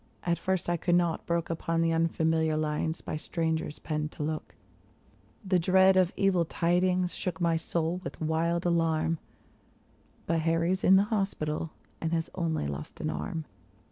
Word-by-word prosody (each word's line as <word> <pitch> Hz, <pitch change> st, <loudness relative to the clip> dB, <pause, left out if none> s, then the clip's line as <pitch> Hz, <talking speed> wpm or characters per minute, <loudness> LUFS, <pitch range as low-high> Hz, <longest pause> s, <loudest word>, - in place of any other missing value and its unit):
At 170 Hz, -1 st, 0 dB
first 190 Hz, -2 st, -1 dB
I 175 Hz, 0 st, +1 dB
could 175 Hz, +1 st, +1 dB
not 175 Hz, -2 st, +1 dB
brook 170 Hz, -1 st, 0 dB
Upon 165 Hz, 0 st, -1 dB
the 165 Hz, 0 st, +2 dB
unfamiliar 160 Hz, -1 st, +1 dB
lines 155 Hz, +1 st, -1 dB
by -, -, -4 dB
strangers 160 Hz, -1 st, -2 dB
penned, 150 Hz, -1 st, -3 dB
to -, -, -4 dB
look; 155 Hz, +1 st, -4 dB, 0.9 s
The 185 Hz, -1 st, +3 dB
dread 190 Hz, +2 st, +5 dB
of 185 Hz, -1 st, +4 dB
evil 195 Hz, -3 st, +3 dB
tidings 180 Hz, +2 st, +1 dB
shook 180 Hz, -3 st, -3 dB
my 170 Hz, -2 st, +2 dB
soul 165 Hz, +2 st, -1 dB
with -, -, -7 dB
wild 165 Hz, +2 st, 0 dB
alarm 165 Hz, -1 st, +1 dB, 0.5 s
— -, -, -34 dB
But 165 Hz, -1 st, +1 dB
Harry's 165 Hz, +3 st, +1 dB
in 190 Hz, -, +7 dB
the 195 Hz, -, +6 dB
hospital, 195 Hz, -7 st, -1 dB, 0.3 s
and 165 Hz, 0 st, -1 dB
has 165 Hz, -1 st, -1 dB
only 165 Hz, -, -1 dB
lost 70 Hz, +1 st, -6 dB
an -, -, -1 dB
arm. 75 Hz, -, -4 dB
165 Hz, 165 wpm, -29 LUFS, 160-175 Hz, 0.9 s, in